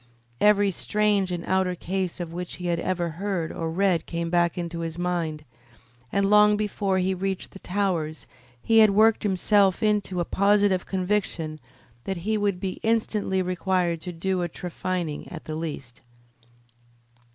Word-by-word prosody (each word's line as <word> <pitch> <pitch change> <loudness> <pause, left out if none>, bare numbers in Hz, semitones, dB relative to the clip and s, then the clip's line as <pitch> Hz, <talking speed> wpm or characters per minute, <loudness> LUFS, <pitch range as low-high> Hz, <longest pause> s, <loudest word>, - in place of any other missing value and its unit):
Every 205 -1 +4
strange 205 0 +1
and 175 -1 -3
outre 190 -1 +1
case 185 +1 -3
of 170 -2 -5
which 180 0 -5
he 180 - -8
had 170 -1 0
ever 175 -2 -1
heard 190 -5 -1
or 165 -1 -3
read 180 0 +1
came 170 -1 -3
back 170 -1 +2
into 170 -1 -4
his 165 0 -4
mind, 170 -4 -2 0.7
and 200 0 +2
long 210 0 +6
before 200 -2 -1
he 185 +1 +1
reached 190 0 -3
the 195 - -11
Towers 180 -6 -2 0.4
he 225 0 +5
had 215 -1 +7
worked 215 +2 +4
himself 200 0 +2
into 205 -4 +1
a 175 - 0
positive 200 -1 +2
conviction 180 -5 -1 0.5
that 190 - -2
he 220 0 +1
would 205 -3 0
be 185 0 -4
instantly 215 -4 0
required 180 -2 0
to 180 - -5
do 180 +2 -1
a 175 - -1
trephining 175 -2 -4
at 160 - -8
the 155 - -5
least. 150 -7 -6
185 Hz, 160 wpm, -25 LUFS, 170-200 Hz, 0.7 s, had